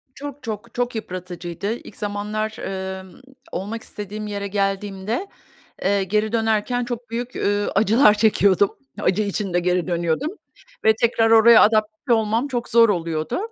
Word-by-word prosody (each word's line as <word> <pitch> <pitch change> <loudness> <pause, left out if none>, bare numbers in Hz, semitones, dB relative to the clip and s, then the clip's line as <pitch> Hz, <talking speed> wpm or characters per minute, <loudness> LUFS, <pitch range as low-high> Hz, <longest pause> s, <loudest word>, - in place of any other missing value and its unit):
Çok, 290 0 -8
çok, 225 0 -6
çok 245 0 -1
yıpratıcıydı. 180 -1 -5
İlk - - -12
zamanlar, 210 +1 -3
emm, 190 0 -5 0.4
olmak 215 +4 -4
istediğim 210 +1 -7
yere 200 -1 -4
geldiğimde, 195 - -2 0.6
eee, 200 0 +2
geri 210 +3 0
dönerken 225 +2 +1
çok 240 -1 -6
büyük, 240 +2 -4
eee, 205 0 0
acılar 215 +2 +5
çekiyordum. 205 -2 +3 0.3
Acı 190 +3 +1
içinde 200 -3 -1
geri 180 0 0
dönüyordum 170 - -1 0.5
ve 220 - +6
tekrar 225 -1 +3
oraya 225 +1 +8
adapte 215 +4 +2
olmam 225 +4 +1
çok 245 -3 -3
zor 230 0 +6
oluyordu. 165 - -1
210 Hz, 140 wpm, -22 LUFS, 195-225 Hz, 0.6 s, oraya